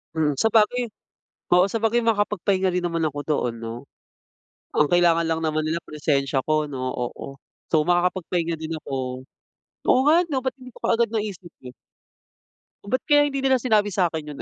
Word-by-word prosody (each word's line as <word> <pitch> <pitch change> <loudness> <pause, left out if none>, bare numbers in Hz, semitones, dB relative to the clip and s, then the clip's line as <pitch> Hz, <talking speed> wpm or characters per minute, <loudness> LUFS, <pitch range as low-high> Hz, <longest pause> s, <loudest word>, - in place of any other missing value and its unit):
Hmm, 150 -3 +1
sabagay 225 - +3 0.7
oo 180 +1 +6
sabagay 225 +2 +1
makakapagpahinga 200 -4 +1
rin 180 - 0
naman 165 -2 -1
ako 145 -1 -3
doon 145 -6 -1
'no? 115 0 -5 1.0
Ang 150 - +5
kailangan 170 -1 +4
lang 160 0 -1
naman 155 -1 -1
nila 165 +2 -1
presensya 140 -3 -1
ko 155 -1 +1
'no, 130 -2 -3
oo. 130 +2 -6 0.3
So, 155 - +5
makakapagpahinga 175 -1 0
din 160 0 -4
ako. 130 -3 -5 0.6
Oo - - +4
nga 340 +3 +5
ano 280 -6 -2
ba't 260 0 -3
hindi 255 -2 -13
ko - - -17
kaagad 230 -1 +1
naisip 200 -6 -4
yun? 125 -1 -10 1.1
Ba't 255 +6 -2
kaya 290 -1 +4
hindi 275 -1 -3
nila 260 -2 +3
sinabi 210 -4 +2
sakin 170 -4 0
'yun - - -8
175 Hz, 160 wpm, -23 LUFS, 155-225 Hz, 1.1 s, oo